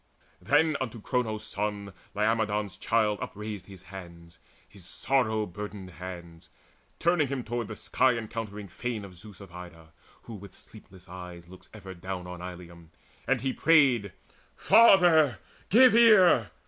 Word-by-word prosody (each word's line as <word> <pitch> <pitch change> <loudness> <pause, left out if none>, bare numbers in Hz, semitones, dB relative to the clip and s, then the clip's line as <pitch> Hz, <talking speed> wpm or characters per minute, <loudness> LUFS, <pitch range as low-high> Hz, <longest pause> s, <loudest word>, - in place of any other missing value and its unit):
Then 155 +3 +2
unto 120 -3 -4
Cronos' 110 -2 -2
Son 100 -1 -4 0.2
Laomedon's 105 -2 0
child 110 -2 0
Upraised 105 -2 -7
his 95 -2 -13
hands, 85 -3 -12 0.3
his 100 -3 -15
sorrow 110 +2 -1
burdened 100 0 -8
hands, 85 -1 -10 0.5
Turning 170 -3 +2
him 135 -2 -4
toward 120 -1 -4
the 110 - -7
sky 130 +4 +1
encountering 105 -2 -6
fane 110 +2 -5
Of 95 - -12
Zeus 95 +2 -14
of 100 -3 -13
Ida, 80 -3 -12 0.3
who 115 - -10
with 100 -2 -11
sleepless 95 -4 -15
eyes 90 -1 -10
Looks 90 +1 -15
ever 95 -3 -10
down 90 0 -6
on 90 -1 -8
Ilium; 85 -2 -10 0.4
and 135 -3 +1
he 130 0 -1
prayed: 135 - +3 0.4
"Father, 175 - +5 0.3
give 250 +4 +6
ear! 195 - +6
105 Hz, 140 wpm, -27 LUFS, 90-125 Hz, 0.5 s, give